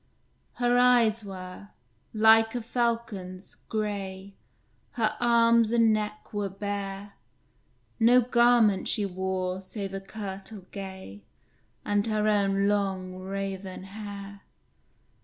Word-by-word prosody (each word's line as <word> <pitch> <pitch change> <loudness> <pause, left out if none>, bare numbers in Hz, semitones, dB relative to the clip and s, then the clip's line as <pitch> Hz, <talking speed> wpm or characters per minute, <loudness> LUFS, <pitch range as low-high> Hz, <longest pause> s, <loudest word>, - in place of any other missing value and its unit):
Her 245 0 +2
eyes 235 -3 +4
were, 190 0 -9 0.4
like 225 +1 +5
a 245 - -1
falcon's, 225 -6 -3
gray, 200 -2 -4 0.6
Her 220 -2 0
arms 235 -1 +4
and 230 -2 +4
neck 210 0 -4
were 205 -1 -2
bare; 200 0 -5 0.9
No 240 +2 +6
garment 235 -4 +3
she 205 - 0
wore 185 0 -3
save 195 0 -6
a 195 - -4
kirtle 195 0 -8
gay, 190 - -8 0.6
And 205 +1 +1
her 215 -1 0
own 200 -1 +2
long, 195 -3 -1
raven 190 0 -5
hair. 200 0 -9
205 Hz, 105 wpm, -27 LUFS, 195-225 Hz, 0.9 s, No